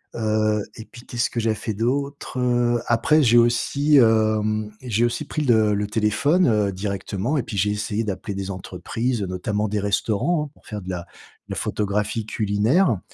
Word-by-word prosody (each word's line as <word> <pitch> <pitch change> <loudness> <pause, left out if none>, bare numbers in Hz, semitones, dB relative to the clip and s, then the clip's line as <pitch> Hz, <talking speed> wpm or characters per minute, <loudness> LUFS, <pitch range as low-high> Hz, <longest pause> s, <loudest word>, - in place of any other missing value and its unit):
heu, 110 -2 +1
et 110 - -9
puis 120 0 -14
qu'est-ce 120 0 -1
que 120 - -3
j'avais 110 0 +1
fait 110 - -4
d'autres, 135 +3 -2
heu? 120 -1 +2
Après, 135 +7 +3
j'ai 120 0 +5
aussi, 140 +5 +3
hem, 110 -2 +2
j'ai 120 -2 +1
aussi 130 +5 -2
pris 155 +1 -3
le 110 -4 +4
le 105 0 -1
téléphone, 110 - +2
heu, 105 -3 +2
directement 100 +7 -2
et 130 - 0
puis, 100 - -6
j'ai 105 +2 +2
essayé 105 +1 -2
d'appeler 100 +1 -4
des 100 0 -4
entreprises, 110 +6 -3
notamment 105 +3 -2
des 105 - -1
restaurants, 110 - 0
hein - - -33
pour - - -25
faire 105 -2 -5
de 90 - -8
la 90 -1 -3
de - - -13 0.4
la - - -3
photographie 105 +1 -1
culinaire, 110 - +1
110 Hz, 185 wpm, -23 LUFS, 105-120 Hz, 0.4 s, j'ai